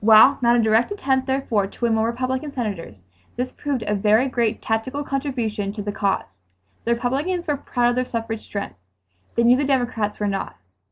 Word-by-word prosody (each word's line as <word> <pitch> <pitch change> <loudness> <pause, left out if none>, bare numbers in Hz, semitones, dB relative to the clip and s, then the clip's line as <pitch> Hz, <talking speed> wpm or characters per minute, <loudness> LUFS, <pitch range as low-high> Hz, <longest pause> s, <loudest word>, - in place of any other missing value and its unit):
While 225 +6 +7
not 240 0 +4
a - - +4
direct 220 - +3
attempt, 265 -9 0
therefore, 250 -7 0
to 235 - -4
win 230 - +2
more 220 0 +2
Republican 255 +4 -2
Senators, 195 - -5 0.3
this 250 +1 -2
proved 275 -5 -3
a 210 - -1
very 215 +5 +3
great 235 -3 0
tactical 255 +6 -2
contribution 245 -8 -2
to 210 -1 -5
the 205 - -2
cause. 195 - -2 0.4
The 235 +1 +2
Republicans 290 +9 -1
were 295 - +1
proud 245 -3 +1
of 240 - 0
their 255 - +1
suffrage 225 -2 -4
strength. 200 - -6 0.6
They 235 - +3
knew 245 +2 +6
the 285 - +1
Democrats 245 -6 0
were 210 - 0
not. 195 -1 -2
235 Hz, 190 wpm, -22 LUFS, 215-265 Hz, 0.6 s, While